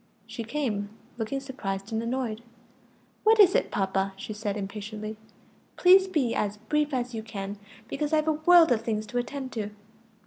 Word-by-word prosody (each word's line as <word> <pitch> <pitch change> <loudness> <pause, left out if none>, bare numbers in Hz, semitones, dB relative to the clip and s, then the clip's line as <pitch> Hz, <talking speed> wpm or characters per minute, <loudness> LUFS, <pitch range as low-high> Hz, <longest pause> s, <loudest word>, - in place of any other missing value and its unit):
She 225 +1 -6
came, 225 -5 -2 0.3
looking 225 +5 -2
surprised 205 -7 -5
and 220 - 0
annoyed. 235 -2 -2 0.8
"What 440 +1 +5
is 380 -2 +8
it, - - +2
papa?" 195 0 0
she 205 +2 -6
said 210 -1 -3
impatiently. 215 +2 -5 0.6
"Please 375 +1 +6
be 290 -10 +1
as 205 0 -1
brief 300 +7 0
as 250 -2 -2
you 225 - -3
can; 200 -2 -6 0.3
because 295 +4 -2
I've 310 0 +2
a - - +5
world 330 0 +6
of 225 -2 +3
things 215 -2 -2
to 245 +4 -2
attend 260 +1 -5
to." 210 -3 -3
230 Hz, 170 wpm, -27 LUFS, 210-290 Hz, 0.8 s, is